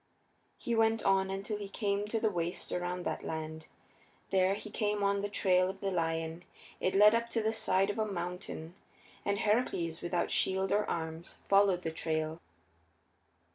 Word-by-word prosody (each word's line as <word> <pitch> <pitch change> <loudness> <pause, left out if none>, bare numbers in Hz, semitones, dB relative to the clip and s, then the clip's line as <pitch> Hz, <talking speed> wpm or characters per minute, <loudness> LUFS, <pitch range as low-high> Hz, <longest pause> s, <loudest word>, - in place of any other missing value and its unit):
He 235 - -3
went 225 -1 +3
on 195 -1 +3
until 195 +2 -3
he 200 -1 -6
came 205 -1 -1
to 225 +1 -1
the 220 -1 +1
waste 175 -1 -3
around 180 0 -2
that - - -2
land: 160 0 -5 0.6
there 190 0 +3
he 210 +1 -8
came 210 -2 0
on 200 0 +2
the 205 - -2
trail 185 -2 +3
of 195 0 -7
the 195 0 -2
lion; 165 -1 -1 0.4
it 185 - 0
led 210 +2 +8
up 235 0 0
the 225 -1 0
side 195 -2 +2
of 205 - -6
a 215 -1 0
mountain, 175 -2 -5 0.5
and 200 0 0
Heracles, 205 -7 0
without 175 0 -1
shield 190 0 +1
or 210 +1 +2
arms, 160 +1 -4
followed 195 -2 +4
the 160 - -2
trail. 160 0 -2
195 Hz, 170 wpm, -32 LUFS, 175-205 Hz, 0.6 s, led